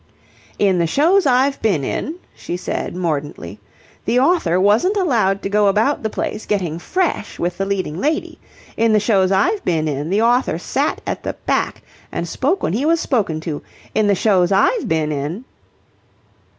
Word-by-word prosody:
"In 190 Hz, -3 st, +2 dB
the 170 Hz, -, +2 dB
shows 330 Hz, -, +3 dB
I've 270 Hz, +2 st, +2 dB
been 190 Hz, -10 st, +1 dB
in," 310 Hz, -, -3 dB, 0.2 s
she 175 Hz, -, -5 dB
said, 180 Hz, -, -4 dB
mordantly, 145 Hz, -, -4 dB, 0.5 s
"the 235 Hz, +3 st, +2 dB
author 260 Hz, -, +2 dB
wasn't 220 Hz, -, +3 dB
allowed 220 Hz, -, +1 dB
to -, -, -1 dB
go 205 Hz, 0 st, +3 dB
about 215 Hz, +8 st, +2 dB
the 220 Hz, -, -2 dB
place 215 Hz, -, -4 dB
getting 175 Hz, -6 st, -1 dB
fresh 350 Hz, -, -2 dB
with 175 Hz, +1 st, -3 dB
the 195 Hz, -, -1 dB
leading 185 Hz, -5 st, -2 dB
lady. 310 Hz, +2 st, -1 dB, 0.4 s
In 225 Hz, -1 st, +2 dB
the 215 Hz, -, +5 dB
shows 195 Hz, -3 st, +2 dB
I've 375 Hz, -, +2 dB
been 160 Hz, -2 st, 0 dB
in 145 Hz, +1 st, -3 dB
the 205 Hz, +4 st, +2 dB
author 245 Hz, +3 st, +2 dB
sat -, -, -1 dB
at -, -, -3 dB
the -, -, -3 dB
back -, -, -1 dB, 0.3 s
and 170 Hz, +1 st, -3 dB
spoke 295 Hz, -, -1 dB
when -, -, 0 dB
he 235 Hz, +7 st, 0 dB
was 330 Hz, +2 st, +3 dB
spoken 205 Hz, -, 0 dB
to. 160 Hz, -3 st, -4 dB, 0.3 s
In 215 Hz, -1 st, +2 dB
the 200 Hz, -, +3 dB
shows 185 Hz, -3 st, +2 dB
I've 210 Hz, -, +2 dB
been 155 Hz, -1 st, 0 dB
in..." 150 Hz, -, -4 dB
200 Hz, 175 wpm, -19 LUFS, 175-260 Hz, 0.5 s, the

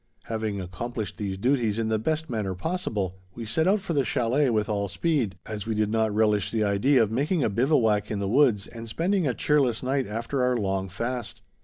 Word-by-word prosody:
Having 110 Hz, -3 st, -3 dB
accomplished 105 Hz, +5 st, -5 dB
these 100 Hz, -2 st, -3 dB
duties 120 Hz, -1 st, +1 dB
in 115 Hz, -1 st, 0 dB
the 110 Hz, -1 st, +1 dB
best 160 Hz, +7 st, -1 dB
manner 105 Hz, -, -2 dB
possible, 100 Hz, -, -3 dB, 0.2 s
we 115 Hz, -, -6 dB
set 160 Hz, +10 st, +1 dB
out 200 Hz, +2 st, +3 dB
for 170 Hz, -, -3 dB
the 140 Hz, -3 st, +2 dB
chalet 125 Hz, +4 st, +1 dB
with 105 Hz, -2 st, +1 dB
all 100 Hz, -2 st, -1 dB
speed, 120 Hz, -, 0 dB
as 105 Hz, -1 st, -6 dB
we 110 Hz, -, -1 dB
did 105 Hz, 0 st, +1 dB
not 110 Hz, -1 st, +2 dB
relish 105 Hz, -1 st, +2 dB
the 110 Hz, -2 st, 0 dB
idea 115 Hz, +6 st, +3 dB
of 110 Hz, -, -2 dB
making 145 Hz, +7 st, +1 dB
a -, -, +1 dB
bivouac 110 Hz, -3 st, +2 dB
in 105 Hz, -, -2 dB
the 100 Hz, -1 st, -2 dB
woods 115 Hz, -3 st, +3 dB
and 115 Hz, -1 st, -9 dB
spending 175 Hz, -, +1 dB
a 125 Hz, -, 0 dB
cheerless 135 Hz, -6 st, +2 dB
night 135 Hz, -1 st, 0 dB
after 115 Hz, +5 st, -2 dB
our 125 Hz, 0 st, +2 dB
long 95 Hz, -2 st, -1 dB
fast. 120 Hz, +5 st, -4 dB
115 Hz, 210 wpm, -26 LUFS, 105-135 Hz, 0.2 s, out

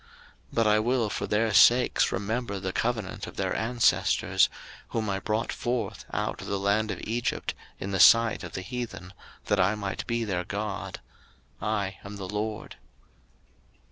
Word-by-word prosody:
03:026:045 -, -, -26 dB, 0.5 s
But 115 Hz, -1 st, +3 dB
I 105 Hz, 0 st, +5 dB
will 120 Hz, 0 st, +1 dB
for 100 Hz, -, -3 dB
their 110 Hz, +2 st, +1 dB
sakes 120 Hz, +4 st, +5 dB
remember 100 Hz, +1 st, -2 dB
the 95 Hz, -1 st, -3 dB
covenant 115 Hz, -5 st, -2 dB
of -, -, -10 dB
their -, -, -1 dB
ancestors, 120 Hz, +1 st, +2 dB, 0.4 s
whom 110 Hz, -3 st, -1 dB
I 95 Hz, -, -1 dB
brought 110 Hz, +3 st, -1 dB
forth 120 Hz, -5 st, -3 dB
out -, -, -2 dB
of -, -, -8 dB
the 100 Hz, -, -1 dB
land 100 Hz, +2 st, +1 dB
of -, -, -3 dB
Egypt 115 Hz, +2 st, -2 dB, 0.3 s
in 100 Hz, -, -4 dB
the 95 Hz, -, -1 dB
sight 115 Hz, +3 st, +6 dB
of -, -, -8 dB
the 95 Hz, -, -4 dB
heathen, 115 Hz, -5 st, -6 dB, 0.3 s
that -, -, +1 dB
I 95 Hz, +3 st, +3 dB
might 100 Hz, -2 st, -4 dB
be 115 Hz, -1 st, 0 dB
their 95 Hz, -5 st, -1 dB
God: 105 Hz, 0 st, -4 dB, 0.6 s
I 100 Hz, -3 st, -2 dB
am 100 Hz, +1 st, -8 dB
the 95 Hz, -2 st, -6 dB
LORD. 105 Hz, +2 st, -4 dB
105 Hz, 170 wpm, -27 LUFS, 100-115 Hz, 0.6 s, sight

